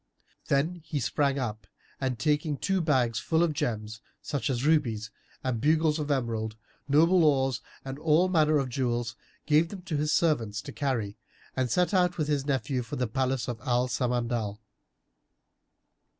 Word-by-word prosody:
Then 160 Hz, +6 st, +1 dB
he 150 Hz, -2 st, -3 dB
sprang 140 Hz, +3 st, +1 dB
up 110 Hz, -5 st, -4 dB, 0.3 s
and 130 Hz, -2 st, -1 dB
taking 150 Hz, +1 st, 0 dB
two 195 Hz, +3 st, 0 dB
bags 130 Hz, -8 st, +2 dB
full 160 Hz, +1 st, +1 dB
of 165 Hz, -3 st, +1 dB
gems 110 Hz, -4 st, -3 dB, 0.2 s
such 140 Hz, -5 st, -3 dB
as 130 Hz, 0 st, -1 dB
rubies 115 Hz, -9 st, +1 dB, 0.3 s
and 125 Hz, -4 st, -1 dB
bugles 155 Hz, +1 st, +3 dB
of 150 Hz, -1 st, -3 dB
emerald, 115 Hz, -5 st, -1 dB, 0.3 s
noble 165 Hz, +5 st, +5 dB
ores 135 Hz, -4 st, +2 dB, 0.2 s
and 135 Hz, +1 st, -6 dB
all 160 Hz, +3 st, +4 dB
manner 155 Hz, -5 st, +3 dB
jewels 120 Hz, -2 st, -2 dB, 0.3 s
gave 155 Hz, +2 st, +3 dB
them 190 Hz, -3 st, -8 dB
to 165 Hz, -5 st, -2 dB
his 150 Hz, +1 st, 0 dB
servants 120 Hz, -10 st, +1 dB
to -, -, -7 dB
carry 115 Hz, -8 st, -2 dB, 0.4 s
and 130 Hz, -1 st, 0 dB
set 180 Hz, -, +1 dB
out 180 Hz, -2 st, +3 dB
with 155 Hz, -2 st, -1 dB
his 140 Hz, -1 st, 0 dB
nephew 135 Hz, -1 st, 0 dB
for 115 Hz, -, -6 dB
the 125 Hz, -, 0 dB
palace 130 Hz, 0 st, -1 dB
of 120 Hz, -2 st, -4 dB
Al 125 Hz, -1 st, +1 dB
Samandal. 120 Hz, -4 st, -1 dB
135 Hz, 160 wpm, -28 LUFS, 120-155 Hz, 0.4 s, noble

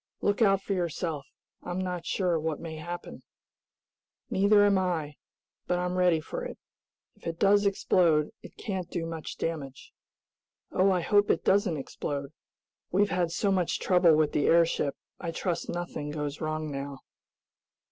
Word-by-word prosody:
"Look 205 Hz, +3 st, 0 dB
out 195 Hz, -2 st, +4 dB
for 200 Hz, -, -1 dB
yourself. 165 Hz, -4 st, -2 dB, 0.3 s
I'm 175 Hz, -, -4 dB
not 180 Hz, -2 st, -3 dB
sure 180 Hz, -4 st, +1 dB
what 155 Hz, -1 st, -2 dB
may 160 Hz, -1 st, -6 dB
happen." 175 Hz, +2 st, -7 dB, 1.1 s
"Neither 205 Hz, +1 st, +5 dB
am 200 Hz, -2 st, +4 dB
I, 165 Hz, -5 st, -1 dB, 0.5 s
but 180 Hz, -, +1 dB
I'm 180 Hz, 0 st, -1 dB
ready 180 Hz, -3 st, +4 dB
for -, -, -5 dB
it. -, -, -6 dB, 0.6 s
If -, -, -11 dB
it 165 Hz, 0 st, -3 dB
does 205 Hz, +1 st, +4 dB
explode 170 Hz, -6 st, +3 dB
it -, -, -13 dB
can't 190 Hz, -5 st, -4 dB
do 165 Hz, -, -3 dB
much 165 Hz, -1 st, -6 dB
damage." 145 Hz, -5 st, -5 dB, 0.8 s
"Oh, 190 Hz, +2 st, +3 dB
I 185 Hz, -2 st, +2 dB
hope 205 Hz, +3 st, +3 dB
it -, -, +1 dB
doesn't 195 Hz, -4 st, +3 dB
explode. 140 Hz, 0 st, -4 dB, 0.6 s
We've 200 Hz, +3 st, +2 dB
had 180 Hz, -2 st, +1 dB
so 195 Hz, +4 st, 0 dB
much 185 Hz, -3 st, +1 dB
trouble 180 Hz, -3 st, +5 dB
with 155 Hz, -1 st, +2 dB
the 145 Hz, -, +1 dB
airship, 165 Hz, -4 st, +3 dB, 0.2 s
I 170 Hz, -, -4 dB
trust 170 Hz, 0 st, -2 dB
nothing 175 Hz, -4 st, -4 dB
goes 150 Hz, -1 st, -4 dB
wrong 155 Hz, -1 st, -2 dB
now." 140 Hz, -1 st, -5 dB
175 Hz, 155 wpm, -28 LUFS, 155-190 Hz, 1.1 s, Neither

